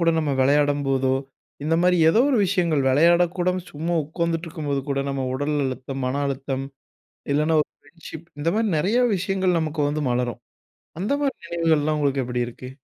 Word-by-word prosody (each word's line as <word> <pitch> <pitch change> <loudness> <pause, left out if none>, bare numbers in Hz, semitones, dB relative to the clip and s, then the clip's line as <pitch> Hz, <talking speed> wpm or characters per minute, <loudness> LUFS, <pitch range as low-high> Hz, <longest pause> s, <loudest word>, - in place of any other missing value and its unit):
கூட 165 0 +4
நம்ம 155 -3 0
விளையாடம்போதோ, 135 -1 +2 0.5
இந்த 160 +2 +1
மாரி 180 0 +4
ஏதோ 220 - +4
ஒரு 265 - +2
விஷயங்கள், 170 -7 +1
விளையாட 170 +6 +5 0.2
கூட 175 0 +1 0.2
சும்மா 165 +4 -2
உக்கார்ந்துட்டுருக்கும் 165 0 -3
போது 140 -1 +1
கூட, 140 - 0
நம்ம 135 -1 -2
உடல் 145 +3 -1
அழுத்தம், 130 +1 -4
மன 140 +3 -1
அழுத்தம், 135 0 -3 0.7
இல்லன்னா, 155 +2 +2
ஒரு - - -57
ஃப்ரெண்ட்ஷிப் 160 +1 -12
இந்த 155 +3 +1
மாரி 220 0 +1
நெறையா 215 +11 +2
விஷயங்கள் 185 -1 0
நமக்கு 155 -1 -2
வந்து 150 +1 -2
மலரும். 120 -1 -1 0.6
அந்த 200 +8 -1
மாரி 275 -2 0
நினைவுகள்லாம், 160 -3 +1
உங்களுக்கு 140 -2 +1
எப்டி 125 0 -2
இருக்கு? 125 +1 -10
150 Hz, 165 wpm, -23 LUFS, 135-170 Hz, 0.7 s, விளையாட